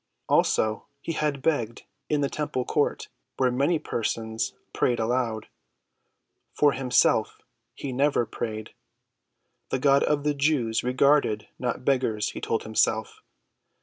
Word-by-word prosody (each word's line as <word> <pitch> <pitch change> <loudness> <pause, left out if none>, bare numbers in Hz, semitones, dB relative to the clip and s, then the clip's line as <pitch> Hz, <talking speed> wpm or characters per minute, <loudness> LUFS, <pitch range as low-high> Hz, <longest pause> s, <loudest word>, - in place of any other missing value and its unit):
Also, 110 0 +2
he 165 - -4
had 150 -4 -1
begged 120 -8 0 0.3
in 150 -1 +1
the 140 - +2
temple 135 -4 -3
court, 150 - 0 0.3
where 130 -1 +2
many 140 +7 +2
persons 110 -4 -2 0.2
prayed 120 -2 +1
aloud. 115 -1 -1 1.1
For 145 -1 +4
himself, 130 -2 +2 0.4
he 135 -2 -5
never 140 -1 +2
prayed. 110 -1 -5 1.0
The - - 0
God 140 +1 +4
of 145 -1 +1
the 150 0 +1
Jews 140 -6 +1
regarded 125 -3 +2
not 125 0 -3
beggars, 125 -6 +1
he - - -7
told 115 - -1
himself. 110 0 0
130 Hz, 125 wpm, -26 LUFS, 115-145 Hz, 1.1 s, For